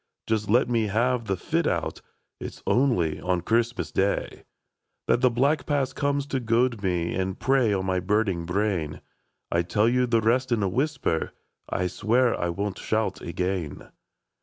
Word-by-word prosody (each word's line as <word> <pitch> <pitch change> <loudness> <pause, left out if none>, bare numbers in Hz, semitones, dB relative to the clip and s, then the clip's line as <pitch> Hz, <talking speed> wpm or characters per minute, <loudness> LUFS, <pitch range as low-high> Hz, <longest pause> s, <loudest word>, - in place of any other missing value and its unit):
Just 110 -2 -1
let 125 +5 +4
me 115 -3 +1
have 120 +3 +1
the 95 -3 -1
fit - - 0
out. - - -2 0.4
It - - -6
's - - -18
only 115 - +2
on 90 -1 0
Christmas 115 +5 0
Day 100 +1 -1 0.6
That 120 - +2
the 125 - +5
black 140 +6 +1
past 140 -3 0
comes 140 0 0
to 135 -2 -2
goad 115 -1 +1
me. 90 -3 -1
And 95 0 -2
prey 130 -4 +3
on 95 -2 0
my 95 -1 +1
burning 95 -3 0
brain; 90 -5 -1 0.5
I - - +1
'11 85 +1 -1
tell 105 +1 +3
you 125 +1 +2
the 115 -1 +2
rest 125 +4 +1
in 110 -3 +2
a - - +2
whisper, 130 - -1 0.2
— - - -56
I 90 - -1
swear 115 +7 +2
I 85 - -2
won't 100 +3 -3
shout 110 0 -1
again. 90 -3 -3
110 Hz, 180 wpm, -26 LUFS, 95-125 Hz, 0.6 s, the